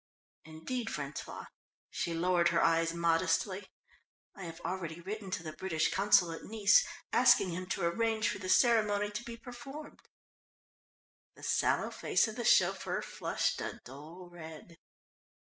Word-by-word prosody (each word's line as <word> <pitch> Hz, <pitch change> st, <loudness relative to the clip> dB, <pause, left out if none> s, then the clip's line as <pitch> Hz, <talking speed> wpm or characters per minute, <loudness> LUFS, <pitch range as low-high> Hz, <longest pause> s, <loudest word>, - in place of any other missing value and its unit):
Indeed, 160 Hz, +10 st, -5 dB
François," 145 Hz, -6 st, -6 dB, 0.5 s
she 170 Hz, -, -2 dB
lowered 170 Hz, 0 st, +3 dB
her 170 Hz, -1 st, +2 dB
eyes 165 Hz, 0 st, +3 dB
modestly, 170 Hz, +3 st, 0 dB, 0.7 s
"I 195 Hz, -, -9 dB
have 165 Hz, 0 st, -8 dB
already 170 Hz, -3 st, -4 dB
written 200 Hz, +3 st, -6 dB
to 185 Hz, -, -3 dB
the 155 Hz, -2 st, -6 dB
British 160 Hz, -4 st, -1 dB
Consul 190 Hz, -3 st, +4 dB
at 165 Hz, -, -7 dB
Nice, 210 Hz, -1 st, +4 dB, 0.3 s
asking 240 Hz, -7 st, +5 dB
him 180 Hz, +2 st, -5 dB
to -, -, -2 dB
arrange 220 Hz, +4 st, +1 dB
for 200 Hz, +2 st, -2 dB
the 185 Hz, -1 st, -5 dB
ceremony 210 Hz, -1 st, +3 dB
to 210 Hz, +3 st, -5 dB
be 235 Hz, -1 st, -8 dB
performed." 255 Hz, +5 st, -10 dB, 1.4 s
The -, -, -16 dB
sallow -, -, +1 dB
face -, -, +1 dB
of 220 Hz, -, -6 dB
the 240 Hz, -, -4 dB
chauffeur -, -, +2 dB
flushed -, -, -2 dB
a -, -, -5 dB
dull 155 Hz, +8 st, -11 dB
red. 160 Hz, 0 st, -11 dB
185 Hz, 145 wpm, -32 LUFS, 165-215 Hz, 1.4 s, asking